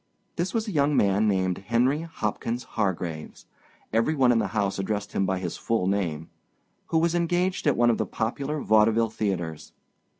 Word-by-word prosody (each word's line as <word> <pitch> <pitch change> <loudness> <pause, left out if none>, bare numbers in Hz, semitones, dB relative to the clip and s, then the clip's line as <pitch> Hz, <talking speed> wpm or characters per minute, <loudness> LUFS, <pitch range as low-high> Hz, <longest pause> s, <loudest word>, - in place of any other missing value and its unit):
This 175 +3 -1
was 225 -1 -1
a - - -3
young 145 -3 +2
man 100 +2 +3
named 95 -2 +1
Henry 120 +8 +1
Hopkins 120 -5 -3
Hargraves—every 95 - -3
one 130 -3 +4
in 115 - +3
the - - 0
house 100 -1 0
addressed 100 +1 -2
him 95 - 0
by 95 0 0
his 90 -2 -4
full 115 -5 0
name—who 95 - -4
was 165 +1 +2
engaged 175 +1 0
at 145 - +3
one 120 0 +4
of 115 - -1
the - - -1
popular 140 +7 -2
vaudeville 110 +1 +3
theaters. 85 -8 -3
110 Hz, 165 wpm, -26 LUFS, 95-145 Hz, -, one